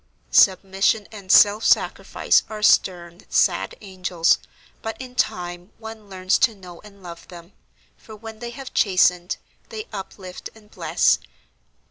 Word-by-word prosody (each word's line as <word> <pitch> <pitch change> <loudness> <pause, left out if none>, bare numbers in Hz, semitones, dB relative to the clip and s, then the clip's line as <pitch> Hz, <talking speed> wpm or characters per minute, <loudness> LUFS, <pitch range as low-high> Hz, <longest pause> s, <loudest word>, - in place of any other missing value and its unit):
Submission 195 +2 +3
and 200 -3 -6
self 210 +2 +6
sacrifice - - +2
are 215 -1 -7
stern, 175 -3 +2
sad - - +1
angels, 185 -4 0 0.4
but 225 0 -6
in 255 -1 -9
time 180 -6 -3
one 220 -2 -11
learns 185 -1 0
to 225 - +2
know 180 -3 -13
and 200 -2 -17
love 170 -1 -10
them, 175 +1 -13 0.4
for 220 - -13
when 220 0 -11
they 240 0 -6
have 260 +2 -10
chastened, 180 -2 +2 0.3
they 440 -2 -7
uplift 190 -2 -8
and 210 -1 -20
bless. - - +2
195 Hz, 135 wpm, -22 LUFS, 180-220 Hz, 0.4 s, self